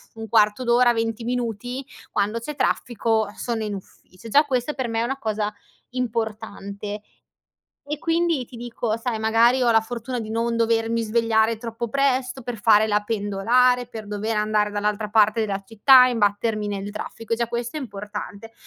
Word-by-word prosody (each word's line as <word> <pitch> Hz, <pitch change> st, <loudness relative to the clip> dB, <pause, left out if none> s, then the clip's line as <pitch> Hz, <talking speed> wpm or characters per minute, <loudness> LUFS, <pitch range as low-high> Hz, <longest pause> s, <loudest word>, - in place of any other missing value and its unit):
1/4 220 Hz, +1 st, +2 dB
d'ora, 240 Hz, 0 st, +4 dB
20 225 Hz, 0 st, -2 dB
minuti, 245 Hz, +2 st, -3 dB, 0.3 s
quando 210 Hz, +3 st, 0 dB
c'è 295 Hz, +5 st, -6 dB
traffico, 225 Hz, -5 st, 0 dB
sono 230 Hz, -2 st, -3 dB
in 210 Hz, -1 st, -3 dB
ufficio. 195 Hz, +3 st, -13 dB
Già 290 Hz, +6 st, +6 dB
questa 260 Hz, +1 st, -1 dB
per 260 Hz, -3 st, -3 dB
me 225 Hz, 0 st, -1 dB
è -, -, +1 dB
una 270 Hz, +3 st, -2 dB
cosa 215 Hz, -2 st, -2 dB, 0.4 s
importante. 215 Hz, -4 st, -4 dB, 0.9 s
E 295 Hz, 0 st, -3 dB
quindi 330 Hz, -5 st, 0 dB
ti 245 Hz, -, -12 dB
dico, 235 Hz, -1 st, -3 dB
sai, 230 Hz, -1 st, -3 dB
magari 230 Hz, +3 st, +4 dB
ho 240 Hz, -1 st, +3 dB
la 225 Hz, -1 st, +4 dB
fortuna 240 Hz, +2 st, -5 dB
di 220 Hz, -1 st, -5 dB
non 230 Hz, +1 st, 0 dB
dovermi 230 Hz, 0 st, +1 dB
svegliare 225 Hz, 0 st, +2 dB
troppo 230 Hz, 0 st, -5 dB
presto 265 Hz, -1 st, +1 dB
per 240 Hz, -2 st, -5 dB
fare 215 Hz, 0 st, +5 dB
la 210 Hz, -1 st, +1 dB
pendolare, 230 Hz, +4 st, +2 dB
per 220 Hz, -3 st, -8 dB
dover 210 Hz, +2 st, -2 dB
andare 210 Hz, 0 st, +1 dB
dall'altra 210 Hz, +1 st, -2 dB
parte 215 Hz, +1 st, +4 dB
della 200 Hz, -2 st, -2 dB
città, 250 Hz, +4 st, +7 dB
imbattermi 215 Hz, -2 st, 0 dB
nel 200 Hz, 0 st, -4 dB
traffico, 225 Hz, +2 st, -4 dB
e -, -, -6 dB
già 235 Hz, 0 st, 0 dB
questo 240 Hz, +4 st, -4 dB
è -, -, -3 dB
importante. 210 Hz, -1 st, -7 dB
225 Hz, 165 wpm, -23 LUFS, 210-245 Hz, 0.9 s, città